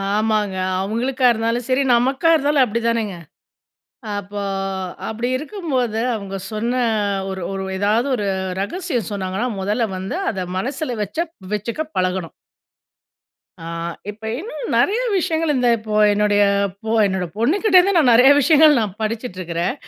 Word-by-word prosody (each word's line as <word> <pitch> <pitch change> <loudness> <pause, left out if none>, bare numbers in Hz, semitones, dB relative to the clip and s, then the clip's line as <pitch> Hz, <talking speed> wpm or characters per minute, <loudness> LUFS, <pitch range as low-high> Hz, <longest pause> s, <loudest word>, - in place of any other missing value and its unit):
ஆமாங்க. 215 -2 0 0.3
அவங்களுக்கா 250 +6 -1
இருந்தாலும் 230 +2 -1
சரி, 255 +2 +2
நமக்கா 265 +7 +2
இருந்தாலும் 285 -2 +3
அப்படிதானங்க? 230 -3 -1 1.0
அப்போ, 205 +1 -5 0.7
அப்படி 230 +2 -3
இருக்கும்போது 270 - -2 0.2
அவங்க 195 -2 -6 0.2
சொன்ன 230 +3 -1 0.6
ஒரு 190 0 -5
ஒரு 190 0 -3
ஏதாவது 215 +6 +1
ஒரு 205 -3 -2 0.3
ரகசியம் 255 - -3
சொன்னாங்கன்னா, 195 +3 -2
மொதல்ல 215 +4 0
வந்து 190 - -4
அத 185 -3 -4
மனசுல 260 +3 -3
வச்சக் 320 - -4 0.2
வச்சுக்க 225 +8 -3 0.2
பழகணும். 185 -2 -1 1.3
ஆ, - - -7 0.5
இப்ப 215 +2 -19 0.2
இன்னும் 465 +6 -5
நிறைய 445 +5 +2 0.2
விஷயங்கள், 325 -3 0
இந்த 250 -1 +2
இப்போ 215 -1 -3 0.2
என்னுடைய 205 0 +3 0.4
பொ 220 - -1
என்னோட 190 -2 -1
பொண்ணுகிட்டருந்து 370 - +4
நான் 280 -7 +5
நிறைய 250 +4 +7
விஷயங்கள் 300 0 +6
நான் 205 -3 -2
படிச்சுட்ருக்குறேன். 185 -4 -3
230 Hz, 125 wpm, -20 LUFS, 205-275 Hz, 1.3 s, நிறைய